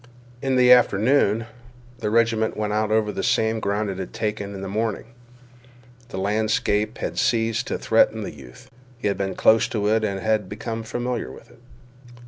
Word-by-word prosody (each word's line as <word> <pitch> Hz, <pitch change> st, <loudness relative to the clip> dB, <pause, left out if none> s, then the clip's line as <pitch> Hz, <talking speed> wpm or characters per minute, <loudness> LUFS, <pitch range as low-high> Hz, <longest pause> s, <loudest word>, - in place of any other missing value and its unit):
In 135 Hz, -1 st, 0 dB
the 125 Hz, -1 st, +5 dB
afternoon, 115 Hz, -1 st, +4 dB, 0.5 s
the 105 Hz, -, -2 dB
regiment 115 Hz, 0 st, +1 dB
went 105 Hz, -1 st, -2 dB
out 110 Hz, 0 st, 0 dB
over 110 Hz, -1 st, +1 dB
the -, -, -4 dB
same 110 Hz, 0 st, +1 dB
ground 105 Hz, +1 st, -1 dB
it 95 Hz, -, -7 dB
had 95 Hz, -, -6 dB
taken 105 Hz, -2 st, -3 dB
in 95 Hz, -, -7 dB
the 95 Hz, -, -5 dB
morning. 110 Hz, +2 st, -2 dB, 1.1 s
The -, -, -7 dB
landscape 110 Hz, +2 st, 0 dB
then -, -, -4 dB
ceased 115 Hz, -2 st, +1 dB
to -, -, -2 dB
threaten 110 Hz, -1 st, +2 dB
the -, -, -6 dB
youth. 75 Hz, -, -14 dB, 0.3 s
He 120 Hz, -, -2 dB
had 100 Hz, -, -2 dB
been 95 Hz, -1 st, -2 dB
close 110 Hz, 0 st, +4 dB
to 105 Hz, -2 st, -2 dB
it 110 Hz, 0 st, +2 dB
and 105 Hz, 0 st, -1 dB
become 115 Hz, +2 st, -5 dB
familiar 120 Hz, +2 st, -3 dB
with 115 Hz, -, -14 dB
it. -, -, -20 dB
110 Hz, 175 wpm, -23 LUFS, 105-115 Hz, 1.1 s, the